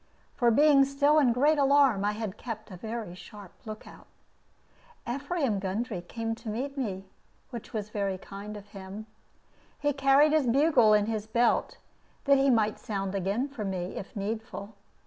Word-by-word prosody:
For 240 -2 +2
being 280 +3 +6
still 285 +2 +3
in 265 -5 +4
great 290 +5 +3
alarm, 275 -7 +4
I 210 - +1
had 215 -2 -5
kept 220 -2 -7
a - - -7
very 220 0 -6
sharp 200 +1 -12 0.2
lookout. 215 0 -10 1.0
Ephraim 275 - -1
Gundry 195 0 -3
came 225 +5 -4
to 230 - -7
meet 265 +6 -3
me, 195 -8 -3 0.5
which 235 -3 -8
was 210 -1 -4
very 200 -3 -2
kind 200 +2 -8
of 205 0 -13
him. 195 +2 -9 0.7
He 290 0 +1
carried 275 +2 +4
his 305 -4 +2
bugle 250 -4 +4
in 210 -1 +3
his 215 -1 -3
belt, 235 +2 +1 0.5
that 280 -1 +5
he 275 0 +3
might 220 -4 +2
sound 195 -4 -3
again 200 +7 -1
for 275 -6 -7
me, 185 -2 -4
if 195 - -8
needful. 210 0 -5
225 Hz, 165 wpm, -28 LUFS, 205-275 Hz, 1.0 s, being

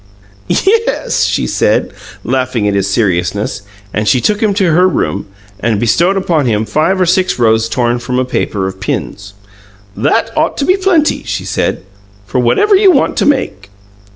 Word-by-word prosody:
"Yes," 450 +5 +1
she - - -1
said, - - 0 0.3
laughing 125 -5 -1
at 100 - 0
his 100 0 0
seriousness; 95 -1 -1 0.3
and 105 0 -1
she 115 +5 +3
took 210 - 0
him 215 -2 +2
to 190 -4 +2
her 180 +4 +4
room, 100 - -2 0.3
and 110 0 0
bestowed 170 - +2
upon 170 -8 0
him 110 -1 0
five 155 - 0
or 185 - +3
six 185 +2 +1
rows 115 -1 +2
torn 120 -1 0
from 125 +1 -3
a 130 - +1
paper 105 -5 -2
of 95 0 -5
pins. 100 +1 -5 0.6
"That 145 - 0
ought 310 - 0
to 280 - -1
be 370 - +3
plenty," 370 -6 +1
she - - -4
said, - - -2 0.4
"for 125 - -2
whatever 395 - +3
you 390 0 +5
want 295 -7 +2
to - - +1
make." 180 - -1
130 Hz, 175 wpm, -13 LUFS, -, 0.6 s, you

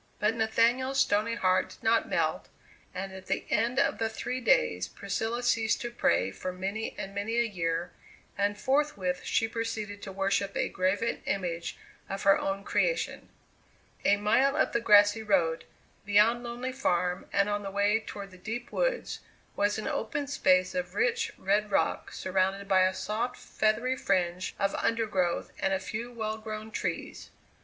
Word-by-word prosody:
But 210 +1 +2
Nathaniel's 235 +4 +2
stony 215 -1 +2
heart 185 -4 +2
did - - -15
not 225 0 +2
melt, - - 0 0.4
and 195 +1 -5
at 190 0 -10
the - - -1
end 235 +4 +1
of 280 - +2
the 225 -1 0
three 250 +3 -4
days 90 - +2
Priscilla 225 - -3
ceased 225 -2 +2
to 240 - -4
pray 95 - +1
for 185 - -5
many 195 +4 -4
and 195 0 -6
many 205 +3 -2
a 235 - +4
year, 170 -5 -2 0.4
and 205 +1 0
forthwith 260 -10 0
she 225 - +1
proceeded 220 -3 -4
to 195 - -7
worship 195 +1 0
a - - 0
graven 195 +5 0
image 175 -3 -2 0.3
of 195 0 -4
her 195 0 +6
own 195 0 -2
creation. - - -1 0.7
A 205 - +4
mile 260 +7 +3
up - - +2
the 235 - +2
grassy 205 -1 +6
road, 180 -6 +1 0.4
beyond 210 +4 +4
Lonely 240 +2 -4
Farm 180 -8 0
and 200 - +2
on 205 0 -1
the 200 - -5
way 205 +2 +2
toward 200 -3 -8
the 185 - -14
deep 225 +5 -5
woods, - - -1 0.4
was 205 +1 +1
an 215 - -4
open 290 0 -2
space 185 -9 +2
of 270 -1 -3
rich, 470 +1 +1
red 205 +2 +1
rock 195 - 0
surrounded 190 +1 -1
by 190 -1 +4
a 185 - -1
soft, 230 +4 -2
feathery 230 +4 0
fringe 185 -5 0
of 195 -1 0
undergrowth 205 -7 0
and 195 0 +1
a - - -1
few 230 +5 -5
well 220 -2 -3
grown 215 0 -6
trees. - - -4
210 Hz, 165 wpm, -29 LUFS, 195-230 Hz, 0.7 s, her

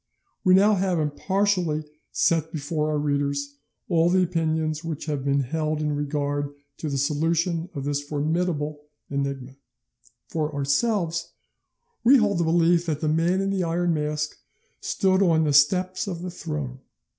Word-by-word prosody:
We 185 0 +6
have 200 0 +4
now 185 -3 +1
impartially 175 +1 0 0.3
set 160 -1 +1
before 155 -1 -2
our 150 - 0
readers 140 -1 -1 0.3
all 170 -1 +3
the 185 +1 +4
opinions 160 -2 -1
which 160 -3 -4
have 145 -4 -2
been 140 0 +2
held 155 +3 -1
in 150 -1 -1
regard 145 0 -2 0.2
to 155 - -4
the 140 - -1
solution 165 +4 0
of 140 - -4
this 145 0 -1
formidable 150 +1 -1 0.3
enigma. 140 -1 -3 0.7
For 155 -1 -2
ourselves, 165 +4 0 0.7
we 260 +4 +7
hold 205 -6 +2
the - - +2
belief 170 +1 +3
that 155 -2 -1
the 155 - +1
Man 170 +4 +2
in 195 0 0
the 190 -2 0
Iron 170 +1 +1
Mask 150 -1 -2 0.4
stood 190 0 +1
on 165 -4 +4
the 150 -2 +1
steps 185 +8 +3
of 175 -3 -4
the 180 - -4
throne. 150 -7 -5
160 Hz, 155 wpm, -25 LUFS, 145-175 Hz, 0.7 s, we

